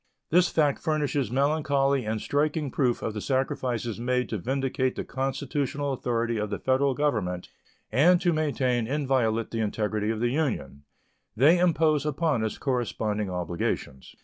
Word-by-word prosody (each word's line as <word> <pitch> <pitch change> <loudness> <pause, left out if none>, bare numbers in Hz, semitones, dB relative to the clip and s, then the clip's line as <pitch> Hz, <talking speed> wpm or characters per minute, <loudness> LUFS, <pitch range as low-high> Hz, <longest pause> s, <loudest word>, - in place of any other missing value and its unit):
This 175 +2 +5
fact 150 -3 +2
furnishes 145 -5 0
melancholy 140 -1 +1
and 110 0 -1
striking 150 +2 0
proof 125 -4 0
of 110 - -2
the 105 - -4
sacrifices 125 -3 -1
made 125 +1 0
to 110 - -2
vindicate 130 +3 -1
the - - -3
constitutional 140 +1 -2
authority 120 -2 -1
of 105 -1 -2
the 100 - -2
Federal 130 +1 +1
Government 105 -12 -1 0.4
and 175 +6 +5
to 175 -1 +2
maintain 130 -6 0
inviolate 130 -5 0
the 115 - -3
integrity 105 0 -1
of 110 -1 -1
the 120 +1 +1
Union 120 - -2 0.5
They 155 +9 +5
impose 160 -4 +3
upon 150 -4 0
us 110 - -2
corresponding 110 -6 -1
obligations. 85 -6 -3
130 Hz, 145 wpm, -27 LUFS, 110-145 Hz, 0.5 s, This